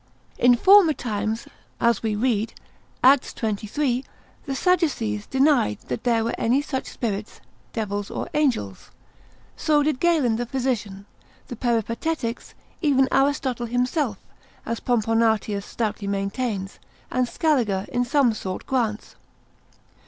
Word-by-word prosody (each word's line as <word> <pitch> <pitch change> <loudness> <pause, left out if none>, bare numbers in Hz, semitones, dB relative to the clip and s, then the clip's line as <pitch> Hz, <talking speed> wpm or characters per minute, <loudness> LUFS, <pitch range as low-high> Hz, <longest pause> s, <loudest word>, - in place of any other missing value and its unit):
In 245 0 +6
former 375 - +6
times, 220 -3 -3 0.3
as 235 -3 +2
we 220 -2 -1
read, 225 -1 0 0.5
Acts 265 +1 +5
xxiii., 240 +5 -1 0.4
the 270 - -2
Sadducees 280 - 0
denied 265 - +2
that 125 - -4
there 230 -2 +2
were 230 - -1
any 245 +4 +2
such 265 -3 -4
spirits, 215 -3 -4 0.3
devils, 205 -2 -3
or - - -4
angels. 245 - -1 0.7
So 300 -1 +2
did 295 -3 0
Galen 305 -10 +2
the 240 0 -3
physician, 230 -7 -2 0.4
the 245 - -5
Peripatetics, 235 +3 -2 0.3
even 270 -5 +3
Aristotle 270 -3 +1
himself, 245 - 0 0.5
as 230 0 -3
Pomponatius 225 -3 +1
stoutly 215 -3 -3
maintains, 200 0 -3 0.3
and 255 -1 +1
Scaliger 235 - +1
in 245 - +1
some 245 -1 +3
sort 190 -3 -5
grants. 230 -5 -1
240 Hz, 120 wpm, -24 LUFS, 215-270 Hz, 0.7 s, In